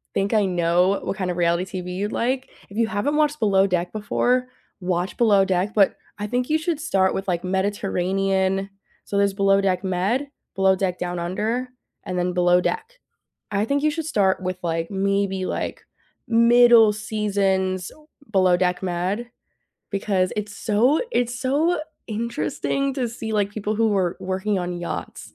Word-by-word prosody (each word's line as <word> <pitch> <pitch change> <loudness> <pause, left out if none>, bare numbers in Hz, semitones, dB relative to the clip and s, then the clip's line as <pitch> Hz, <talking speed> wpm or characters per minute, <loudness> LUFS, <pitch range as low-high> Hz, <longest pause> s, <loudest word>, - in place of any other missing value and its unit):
think 195 +3 0
I 210 -2 +3
know 180 +1 +2
what - - -3
kind 185 -3 -2
of 175 - -2
reality 175 +2 0
TV 180 0 -6
you'd 205 +3 -2
like. 255 +2 -1 0.2
If 200 - -10
you 230 -1 +2
haven't 220 +8 -1
watched 300 0 +1
Below 195 -2 +3
Deck 180 -1 -1
before, 250 +4 0 0.3
watch 180 0 -2
Below 205 -5 +4
Deck, 190 +2 0
but 200 -3 +4 0.2
I 205 - -4
think 245 +4 -1
you 310 - +3
should 315 -1 -2
start 190 - +1
with 195 - -4
like 175 -1 -1
Mediterranean. 195 0 0 0.4
So 200 - -3
there's 200 0 +2
Below 195 0 +3
Deck 190 0 0
Med, 195 +10 0 0.3
Below 190 0 +4
Deck 185 -1 -1
Down 175 0 -3
Under, 220 +9 -2 0.4
and 180 - -3
then 180 0 0
Below 180 0 +4
Deck. 455 - -3 0.5
I 205 +1 +1
think 280 +4 0
you 305 - +4
should 320 +1 -4
start 195 -11 +1
with 185 0 -3
like 165 -1 -1
maybe, 195 -1 0
like, - - -4 0.4
middle 235 -1 +6
seasons 195 -3 -1 0.4
Below 185 -3 +4
Deck 180 0 0
Med, 190 +6 -2 0.6
because 195 -2 0
it's 210 -1 -4
so 235 +8 +2
it's 245 - 0
so 295 +6 +1 0.3
interesting 235 +4 -2
to 255 -3 -1
see, 225 -1 -6
like, 205 -2 +1
people 215 0 -2
who 225 0 +3
were 190 -4 0
working 190 +2 -1
on 175 -1 -4
yachts 175 - -6
200 Hz, 170 wpm, -23 LUFS, 185-230 Hz, 0.6 s, middle